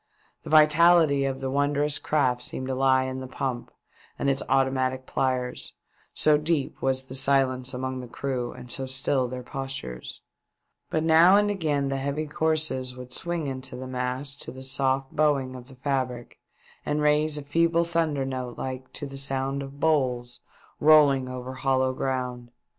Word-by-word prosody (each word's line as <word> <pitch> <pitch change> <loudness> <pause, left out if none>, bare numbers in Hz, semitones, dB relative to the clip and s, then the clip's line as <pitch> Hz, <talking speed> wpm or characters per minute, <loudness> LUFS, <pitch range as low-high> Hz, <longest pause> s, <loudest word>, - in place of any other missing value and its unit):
The - - -10
vitality 155 -2 +5
of 135 -1 -3
the 135 -1 -2
wondrous 145 +1 +1
craft 130 -5 +1
seemed 130 - -4
to - - 0
lie 130 0 +3
in 130 0 -4
the 130 - -7
pump 130 -2 -4 0.5
and 140 - +1
its 135 - 0
automatic 130 -1 +1
plyers, 130 -2 -2 0.4
so 150 -1 +3
deep 150 -2 -1
was 130 0 0
the 130 - -10
silence 130 -1 +2
among 130 0 -4
the 125 - -7
crew 125 -1 -3
and 125 - -9
so 135 +1 -3
still 130 0 0
their 125 0 -6
postures; 135 - -6 0.7
but 155 - 0
now 165 +4 +6
and 205 0 +3
again 150 -8 -1
the 135 - -1
heavy 140 +3 -2
courses 150 -5 0
would 125 0 -9
swing 170 +1 -2
into 130 -1 -4
the 130 +1 -7
masts 130 +2 -3
to - - -7
the 130 0 -9
soft 135 0 0
bowing 140 -4 +1
of 125 -1 -10
the 135 - -13
fabric 130 -3 -3 0.4
and 150 0 -1
raise 150 0 +3
a 145 - -5
feeble 165 +3 +2
thunder 165 -5 0
note 130 -2 -5
like 130 0 -6
to - - -5
the 135 -1 -5
sound 135 0 -1
of 140 +1 -9
bowls 125 -6 0 0.4
rolling 145 -4 +5
over 130 0 -6
hollow 130 0 +1
ground. 125 -2 -3
135 Hz, 170 wpm, -26 LUFS, 130-150 Hz, 0.7 s, now